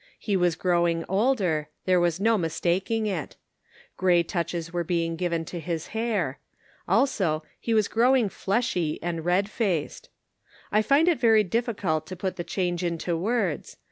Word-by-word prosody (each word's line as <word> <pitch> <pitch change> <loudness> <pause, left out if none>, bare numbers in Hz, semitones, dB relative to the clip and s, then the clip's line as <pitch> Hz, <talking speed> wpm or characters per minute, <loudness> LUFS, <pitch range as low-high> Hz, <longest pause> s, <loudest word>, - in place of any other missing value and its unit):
He 205 - -1
was 175 -3 +2
growing 170 -2 +1
older, 190 - +1 0.2
there 185 -1 +4
was 175 0 +1
no 225 +3 +3
mistaking 185 +5 0
it; 185 -7 -3 0.6
gray 180 -2 +4
touches 170 -1 -3
were 175 -1 0
being 165 -1 -1
given 170 -1 -1
to 175 - -6
his 165 -1 -4
hair. 210 - -1 0.5
Also 185 - +1 0.2
he 230 - -1
was 215 -2 +3
growing 245 0 +3
fleshy 195 -6 -1
and 170 -2 -3
red 180 +4 +2
faced. 195 -8 -2 0.6
I 215 - +4
find 280 +9 +3
it 340 -6 +3
very 225 -3 +5
difficult 195 -7 -1
to 185 - -6
put 185 0 -3
the 175 - -4
change 175 -1 -2
into 170 0 -1
words. 195 -2 -1
180 Hz, 155 wpm, -26 LUFS, 170-215 Hz, 0.6 s, very